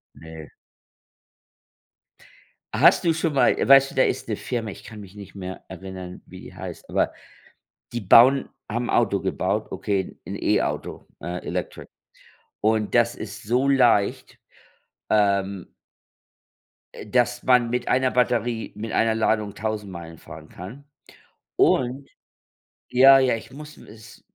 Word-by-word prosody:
Ne. 80 0 -11 2.3
Hast - - +5
du 170 - +3
schon 160 -2 -1
mal 135 - +3
weißt 135 0 +5
du, - - -14
da 130 - +4
ist 130 - -1
'ne 110 - -1
Firma, 115 -1 -4
ich - - -11
kann 110 -1 -11
mich 100 -1 -13
nicht 100 -1 -12
mehr 95 -1 -7
erinnern, 95 -1 -9
wie - - -12
die - - -12
heißt, - - -9
aber - - 0 0.8
die 120 - -4
bauen 125 +7 +6 0.2
haben 120 +2 -2
'n - - -6
Auto - - +2
gebaut, - - -2
okay, 100 -3 -2
'n - - -5
E-Auto, - - -2
äh, 90 0 -6
Electric. - - -5 0.7
Und 110 0 0
das 120 -1 +3
ist 105 0 -8
so 125 +6 0
leicht, 120 -7 +2 0.7
ähm 100 -3 0 1.3
dass 120 +2 0
man 125 -2 +3
mit 125 0 -2
einer 130 0 +2
Batterie, 120 -2 0
mit 110 +2 -6
einer 115 0 +2
Ladung 110 -2 0
1.000 105 -1 -4
Meilen 85 -2 -9
fahren 80 0 -12
kann. 110 +11 -11 0.7
Und 130 +2 +1 0.8
ja, 135 +2 +7
ja, 130 -3 +2
ich 110 - -11
muss 150 +2 -11
es 110 -1 -15
110 Hz, 140 wpm, -23 LUFS, 100-125 Hz, 2.3 s, ja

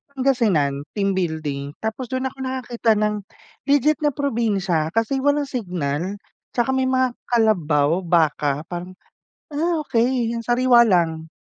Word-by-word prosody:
Pangasinan, 195 - +1
team 200 -1 +1
building. 155 -6 -3
Tapos 220 +3 -3
dun 260 +2 -2
ako 270 - -23
nakakita 250 -4 0
ng, 210 0 +1 0.5
legit 290 +2 +3
na 300 -2 +1
probinsya 205 - 0
kasi 225 +4 +1
walang 285 +2 +2
signal. 180 - -3 0.4
'Tsaka 245 +2 +1
may 260 0 +1
mga 260 -1 +2 0.2
kalabaw, 170 -9 +2
baka 150 -4 +1
parang, 180 +1 -6 0.6
ah, 320 +1 0
okey 240 -2 +1
yung 235 - -3
sariwa 240 +1 +4
lang. 160 -4 +1
220 Hz, 130 wpm, -22 LUFS, 165-260 Hz, 0.6 s, sariwa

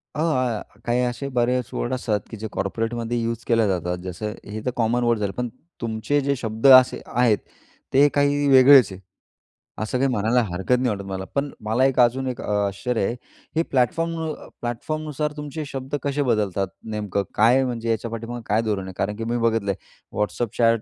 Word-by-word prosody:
अ, - - -4
आ, 130 -8 +1
आ, - - -9 0.2
काही 120 +1 +1
असे 125 +3 -2
बरेच 125 0 +1
वर्ड 120 - -2
असतात 110 -4 0
की 110 - -6
जे 110 - -5
कॉर्पोरेटमध्ये 115 +3 -2
यूज 115 0 -3
केले 115 -2 +3
जातात. 90 -2 -1
जसं 100 +4 -4
हे 105 +1 -6
तर 125 - +1
कॉमन 120 +1 +1
वर्ड 120 -2 +2
झालं. 100 -2 -1
पण 125 - -1 0.3
तुमचे 115 +5 0
जे 140 +1 0
शब्द 110 +1 0
असे 130 -1 +7
आहेत, 120 -3 +2 0.6
ते 140 +2 +6
काही 145 0 +2
वेगळेच 130 -4 +8
आहेत. 95 0 -9 0.8
असं 110 +3 -1
काही 135 +1 +2
म्हणायला 115 +2 +2
हरकत 95 +6 0
नाही 125 -1 +1
वाटत 100 -2 -3
मला. 95 0 -4
पण 140 0 0 0.2
मला 115 +5 +2
एक 135 -1 +1
अजून 130 +2 +3
एक 125 - -4
अ, - - -5 0.2
आश्चर्य 100 +3 -2
आहे. 120 - -1 0.4
हे 165 - +3
प्लॅटफॉर्म 165 +6 +1
अ, 155 -1 -5
प्लॅटफॉर्मनुसार 150 +5 -3
तुमचे 150 +1 -5
शब्द 135 +1 -4
कसे 145 0 0
बदलतात? 100 -3 0 0.3
नेमकं 100 -2 -1
काय, 120 +5 +5
म्हणजे 115 -2 -3
याच्या 115 0 -1
पाठीमागं 115 +1 -5
काय 105 +2 +2
धोरण 105 -4 -1
आहे? 95 - -7
कारण 105 +1 -1
की 115 - -5
मी - - +1
बघितलंय, 105 -4 0 0.4
WhatsApp 105 +2 -2
चॅट 115 -1 +4
120 Hz, 195 wpm, -23 LUFS, 110-130 Hz, 0.8 s, वेगळेच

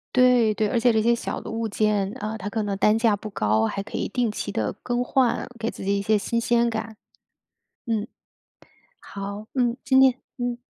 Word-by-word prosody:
对 250 -3 +5
对， 215 0 0
而 220 - 0
且 240 +1 +4
这 220 -1 +2
些 235 +2 +3
小 - - -4
的 - - -8
物 225 0 -2
件， 205 -2 +1
呃， 215 +1 -4
它 205 0 -5
可 220 0 -2
能 200 -1 -2
单 210 +2 +4
价 225 -2 +3
不 215 +1 -8
高， 110 - +1
还 200 - -2
可 200 - -6
以 - - -2
定 245 +1 0
期 210 - -4
地 105 -2 -1
更 245 0 -1
换， 255 -2 +1
给 230 0 -2
自 - - -8
己 200 0 +1
一 - - -1
些 215 +2 +2
新 230 +3 -1
鲜 235 0 +2
感。 220 -1 -5 0.9
嗯。 220 -1 -1 0.9
好， 200 +1 -7
嗯， 245 -2 +1
今 265 +1 +5
天 260 -2 +6 0.2
嗯。 245 -1 -2
220 Hz, 225 characters per minute, -24 LUFS, 205-235 Hz, 0.9 s, 天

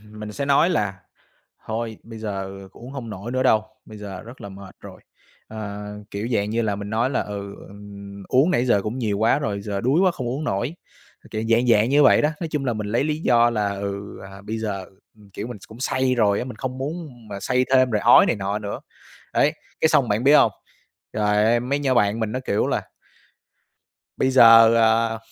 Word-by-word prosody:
mình 105 0 -9
sẽ 140 - -3
nói 140 +5 +3
là 100 - -1 0.7
"Thôi 110 0 -4
bây 115 -1 -11
giờ 95 -2 -6
uống 120 +2 -11
hông 120 -5 -7
nổi 105 +4 -7
nữa 130 0 0
đâu, 110 -4 +3 0.2
bây 110 -1 -12
giờ 100 -3 -8
rất 120 +3 -12
là 100 - -8
mệt 95 -1 -12
rồi," - - -12 0.5
ờ, 105 -2 -7 0.3
kiểu 105 +3 -4
dạng 105 -2 0
như 115 +1 0
là, 105 -2 -1
mình 100 0 -6
nói 115 +5 0
là 130 - 0
"ừ, 100 -1 -7
ừ, 100 - -13 0.5
uống 135 +7 +3
nãy 125 -9 +1
giờ 100 -5 +3
cũng 110 +6 -4
nhiều 105 -4 -1
quá 115 +5 +3
rồi, 105 -8 -3
giờ 100 -1 -4
đuối 135 +8 +2
quá 185 -1 +4
không 130 -7 -5
uống 135 +6 -3
nổi," 120 +6 -2 0.6
kiểu, 110 0 -3
dạng 115 +2 +3
dạng 110 -1 +4
như 145 +2 +5
vậy - - +5
đó. 150 - +2
Nói 165 - -3
chung 150 -3 -3
là 125 - 0
mình 105 -2 -4
lấy 115 +6 +1
lý 155 0 -2
do 120 -5 +4
là, 105 -3 0
ừ, 100 0 -6
à, 95 0 -12
bây 110 +2 -5
giờ, 100 -4 -4 0.3
ừm, 105 -2 -19
kiểu, 100 +3 -6
mình 120 -3 -8
cũng 110 +3 -13
say 130 -1 0
rồi 105 -4 +2
á, - - -3
mình 125 -3 -8
không 130 +1 -5
muốn 155 +3 -5 0.2
mà 100 -1 -7
say 125 +4 +1
thêm 130 -1 +4
rồi 105 -2 0
ói - - +7
này - - 0
nọ 100 +1 -2
nữa. 100 -1 -6 0.5
Đấy, 145 - +3 0.3
cái 160 - +4
xong 135 -5 +3
bạn 105 +5 0
biết 145 - +6
hông? - - +5 0.6
Trời 105 -1 +2
ơi, 115 +2 +3
mấy 135 +4 -1
nhỏ 135 -3 0
bạn 105 -1 +2
mình 110 -1 -2
nó, 130 - -2
kiểu 100 - +1
là - - -1 1.3
"Bây 130 - +1
giờ, 115 -2 +8
ờ, 115 0 +2
110 Hz, 225 wpm, -22 LUFS, 105-130 Hz, 1.3 s, giờ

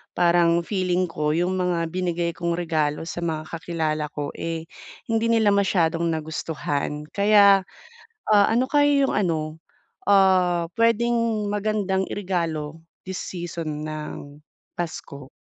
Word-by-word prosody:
parang 170 -1 +3
feeling 185 -2 0
ko 150 -2 0
'yung 180 +2 0
mga 175 -2 0
binigay 175 -1 -1
kong 170 -1 -2
regalo 155 -3 -1
sa 175 - -5
mga 155 -2 -3
kakilala 160 -2 -2
ko 145 -1 -3
eh, 165 -1 -4 0.5
hindi 225 0 +1
nila 220 -3 +4
masyadong 170 -4 +2
nagustuhan. 150 -2 -3
Kaya, 200 -1 +6 0.7
ah, 205 -1 +6
ano 250 +3 +2
kaya 290 -1 +4
'yung - - 0
ano, 160 -5 -1 0.5
ah, 185 -4 +4
puwedeng 230 -1 +1
magandang 205 -2 0
iregalo 165 -5 -3 0.3
this 190 - -4
season 165 -4 -5
ng 150 -1 -7 0.3
Pasko? 145 -5 -6
175 Hz, 120 wpm, -24 LUFS, 160-200 Hz, 0.7 s, Kaya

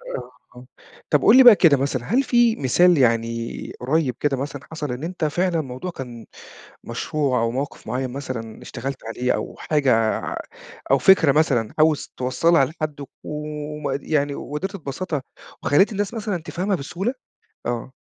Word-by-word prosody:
آه، 125 0 -7 0.2
آه، 125 +1 -12 0.4
طب 150 - +3
قُل 230 +5 +7
لي 265 - +9
بقى 240 -4 +10
كده 165 -6 +5
مثلًا 130 -2 -1
هل 255 +5 +2
في 240 -3 +3
مثال 175 +6 +4
يعني 115 -2 0
قريّب 130 -1 0
كده 140 -2 0
مثلًا 140 0 -5
حصل 150 -4 -4
إن 125 +5 -5
أنت 175 -1 -2
فعلًا 170 +2 0
موضوع 130 +6 -6
كان 120 -6 -8 0.6
مشروع 140 -5 -1
أو 115 - +1
موقف 135 +4 -5
معين 125 +3 -2
مثلًا 125 -4 -6
اشتغلت 130 +2 -6
عليه، 125 +3 -1
أو - - -4
حاجة 125 -8 +2 0.7
أو 135 - +5
فكرة 160 0 +5
مثلًا 135 -7 +1
عاوز 155 -1 +2
توصّلها 135 +5 +3
لحد 150 0 -5 0.2
وم 150 -2 -4
يعني 145 -2 0
وقدرت 190 +10 -5
تبسّطها 155 -2 -4 0.4
وخلّيت 195 +10 +3
الناس 205 +2 -2
مثلًا 205 -6 -3
تفهمها 185 +4 -2
بسهولة؟ 180 - -3 0.5
آه. 120 +2 -3
145 Hz, 155 wpm, -22 LUFS, 125-170 Hz, 0.7 s, بقى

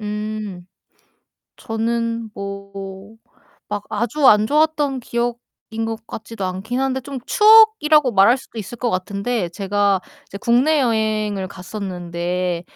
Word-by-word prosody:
음. 210 -3 -5 0.9
저는 230 0 -2
뭐 200 +1 -8 0.5
막 205 -1 -3
아주 240 +7 -1
안 210 0 +6
좋았던 295 -2 +1
기억인 235 -1 -4
것 225 0 -6
같지도 220 -2 -7
않기는 195 +8 -3
한데 265 0 -1
좀 275 +1 -6
추억이라고 425 - +6
말할 215 +6 +5
수도 235 - -11
있을 230 +4 -9
것 245 - 0
같은데 200 +2 -2
제가 200 +1 0 0.3
이제 200 - -8
국내 255 +8 +3
여행을 215 -5 0
갔었는데 180 -2 -4
215 Hz, 245 characters per minute, -20 LUFS, 195-245 Hz, 0.9 s, 안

